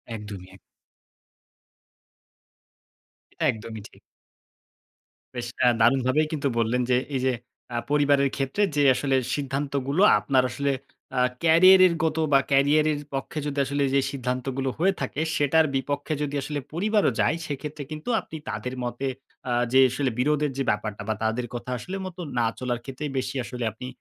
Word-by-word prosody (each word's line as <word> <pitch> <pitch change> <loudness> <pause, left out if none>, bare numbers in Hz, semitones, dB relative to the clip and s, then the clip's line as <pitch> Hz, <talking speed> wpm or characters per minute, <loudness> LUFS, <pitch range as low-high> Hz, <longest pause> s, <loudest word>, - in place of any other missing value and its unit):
একদমই 100 -4 -8
এক। - - -18 2.8
এটা - - -1
একদমই 110 -1 -8
ঠিক। - - -21 1.4
বেশ 120 -1 -4
এ্যা 125 - +6
দারুণভাবেই 130 +5 +3
কিন্তু 145 -3 -1
বললেন 115 +2 +1
যে 125 - +4 0.2
এই 130 - 0
যে 130 - +3 0.4
আ - - 0
পরিবারের 140 -1 +3
ক্ষেত্রে 135 +10 0
যে 145 - +3
আসলে 135 -2 0 0.2
সিদ্ধান্তগুলো 140 +2 -1 0.2
আপনার 130 -2 +2
আসলে 140 +3 -1 0.5
আ - - +3 0.2
ক্যারিয়ারের 185 +2 +7
গত 160 0 0 0.2
বা 135 - +7
কেরিয়ারের 145 +2 +3
পক্ষে 135 +3 -3
যদি 145 -1 -4
আসলে 140 +1 -2
এইযে 135 +1 +2
সিদ্ধান্তগুলো 130 0 -2
হয়ে 195 +3 +3
থাকে, 150 - -3 0.2
সেটার 155 +2 +3
বিপক্ষে 145 +3 -2
যদি 145 -1 -2
আসলে 145 +1 -3
পরিবারও 210 +4 +2
যায়, - - +3
সেক্ষেত্রে 145 +1 -5
কিন্তু 155 +10 -6
আপনি 160 - -9
তাদের 125 +1 -4
মতে 120 +3 -3 0.4
অ্যা 120 -1 0 0.2
যে 130 - +5
আসলে 130 0 0
বিরোধের 150 +1 +1
যে 135 - 0
ব্যাপারটা 105 0 -2
বা 110 - +1
তাদের 115 +3 0
কথা 120 +1 -5
আসলে 185 +10 -6
মতো 185 -1 -7 0.2
না 115 - +3
চলার 125 -1 -2
ক্ষেত্রেই 135 +2 -5
বেশি 130 +1 -2
আসলে 120 0 -6
আপনি 125 +4 -8
135 Hz, 150 wpm, -25 LUFS, 125-150 Hz, 2.8 s, ক্যারিয়ারের